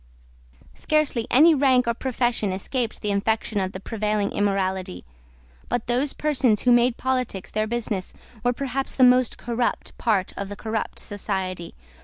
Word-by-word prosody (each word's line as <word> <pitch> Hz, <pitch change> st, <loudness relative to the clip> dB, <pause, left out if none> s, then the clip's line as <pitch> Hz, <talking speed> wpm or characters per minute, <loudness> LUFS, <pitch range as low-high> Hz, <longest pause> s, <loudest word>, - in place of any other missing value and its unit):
Scarcely 295 Hz, -7 st, 0 dB
any 315 Hz, +6 st, +6 dB
rank 260 Hz, -4 st, +3 dB
or 235 Hz, -, +2 dB
profession 240 Hz, -4 st, -1 dB
escaped 225 Hz, +5 st, -3 dB
the 210 Hz, -, 0 dB
infection 215 Hz, +1 st, 0 dB
of 190 Hz, -1 st, -1 dB
the 185 Hz, -, -7 dB
prevailing 210 Hz, -1 st, -1 dB
immorality; 190 Hz, -, -1 dB, 0.6 s
but 240 Hz, -, -1 dB
those 250 Hz, +4 st, 0 dB
persons 260 Hz, -8 st, +1 dB
who 250 Hz, -, +3 dB
made 240 Hz, 0 st, +4 dB
politics 255 Hz, -7 st, -2 dB
their 215 Hz, 0 st, 0 dB
business 215 Hz, -5 st, -3 dB, 0.3 s
were 245 Hz, -, +3 dB
perhaps 270 Hz, +1 st, -2 dB
the 260 Hz, -, +4 dB
most 250 Hz, -1 st, +4 dB
corrupt 240 Hz, 0 st, -2 dB
part 205 Hz, -6 st, +1 dB
of 200 Hz, -1 st, -5 dB
the 205 Hz, -, -6 dB
corrupt 220 Hz, +1 st, -4 dB
society. 190 Hz, -4 st, -4 dB
225 Hz, 150 wpm, -24 LUFS, 200-250 Hz, 0.6 s, any